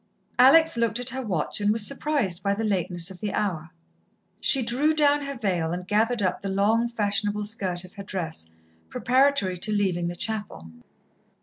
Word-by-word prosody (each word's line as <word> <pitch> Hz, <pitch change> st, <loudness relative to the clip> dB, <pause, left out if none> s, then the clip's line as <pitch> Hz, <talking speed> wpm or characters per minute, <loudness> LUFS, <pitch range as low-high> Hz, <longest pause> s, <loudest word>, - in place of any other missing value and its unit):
Alex 280 Hz, +3 st, +6 dB
looked 230 Hz, 0 st, 0 dB
at 245 Hz, +1 st, -1 dB
her 265 Hz, -, -4 dB
watch, 200 Hz, -4 st, -2 dB
and 205 Hz, 0 st, +2 dB
was 220 Hz, -1 st, +2 dB
surprised 275 Hz, -, -1 dB
by 200 Hz, 0 st, 0 dB
the 225 Hz, -, -3 dB
lateness 180 Hz, -4 st, 0 dB
of 185 Hz, -, -11 dB
the 210 Hz, -2 st, -3 dB
hour. 170 Hz, -6 st, -2 dB, 0.7 s
She 270 Hz, -3 st, +3 dB
drew 275 Hz, +7 st, +1 dB
down 290 Hz, -1 st, +2 dB
her 280 Hz, 0 st, -5 dB
veil, 180 Hz, -8 st, -1 dB
and 180 Hz, +1 st, -6 dB
gathered 220 Hz, +2 st, +1 dB
up 185 Hz, -1 st, -1 dB
the 195 Hz, -, -4 dB
long, 215 Hz, +5 st, +2 dB
fashionable 210 Hz, -2 st, -1 dB
skirt 190 Hz, -4 st, -2 dB
of 185 Hz, -, -13 dB
her 200 Hz, -, -8 dB
dress, 165 Hz, -, -5 dB, 0.4 s
preparatory 255 Hz, -8 st, +1 dB
to 215 Hz, -, +1 dB
leaving 185 Hz, -4 st, 0 dB
the 175 Hz, -, -4 dB
chapel. 205 Hz, -, -3 dB
205 Hz, 180 wpm, -25 LUFS, 185-240 Hz, 0.7 s, Alex